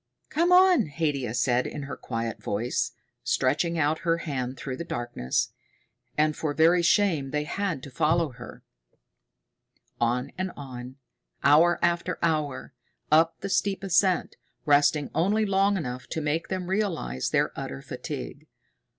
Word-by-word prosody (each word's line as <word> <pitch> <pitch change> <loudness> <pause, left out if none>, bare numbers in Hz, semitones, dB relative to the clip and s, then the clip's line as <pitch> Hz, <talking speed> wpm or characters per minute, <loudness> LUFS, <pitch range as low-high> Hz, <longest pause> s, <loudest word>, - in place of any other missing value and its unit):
"Come 340 +3 +2
on," 360 - +6
Haidia 140 -6 -2
said 125 0 +2
in 145 - -6
her 140 - -6
quiet 115 -2 -4
voice, 115 +5 -1 0.3
stretching 155 +6 +1
out 155 0 +1
her 165 -2 +1
hand 130 -6 -4
through 130 -2 -5
the - - -4
darkness. 120 - -2 0.6
And 155 0 +2
for 150 -2 -2
very 170 +2 +5
shame 170 -6 +2
they 150 +1 -1
had 165 -3 -3
to 140 - -9
follow 160 +3 +2
her. 125 0 -11 1.4
On 125 +3 0
and 185 0 -2
on, 130 -2 -8 0.5
hour 160 +5 +5
after 170 +1 +1
hour, 150 -5 -1 0.4
up 165 +2 +4
the 200 - -4
steep 195 0 0
ascent, 190 -1 +2 0.3
resting 145 0 +3
only 210 +6 +2
long 195 0 +2
enough 125 -6 -5
to 160 - -3
make 155 +2 -1
them 185 -1 -3
realize 170 - -1
their - - +1
utter 70 0 -6
fatigue. - - -7
155 Hz, 140 wpm, -26 LUFS, 130-175 Hz, 1.4 s, on